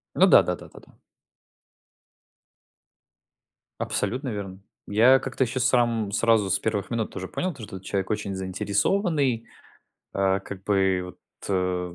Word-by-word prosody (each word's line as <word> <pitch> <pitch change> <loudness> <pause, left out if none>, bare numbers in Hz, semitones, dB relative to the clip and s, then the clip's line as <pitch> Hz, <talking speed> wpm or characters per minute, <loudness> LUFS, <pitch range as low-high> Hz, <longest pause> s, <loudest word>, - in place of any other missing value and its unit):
Ну - - +6
да - - +7
да - - -2
да - - -13
да - - -14
да. - - -21 2.9
Абсолютно 130 +2 -2
верно. 100 -3 -5 0.3
Я 120 +6 +5
как-то 135 0 -1
еще 125 +2 -3
сам 115 -4 +2
сразу 110 -3 +3
с - - +2
первых 105 -3 -2
минут 115 -4 -3
уже 95 -1 -5
понял, 180 - -3
то 115 - -11
что 100 - -8
вот 95 - -11
человек 95 0 -2
очень 105 -2 -2
заинтересованный. 115 - 0 0.7
Э, 95 0 +2
как 95 -1 -9
бы 95 -2 +2
вот, 90 - -11 0.3
э, 90 -2 -1
105 Hz, 145 wpm, -25 LUFS, 95-120 Hz, 2.9 s, да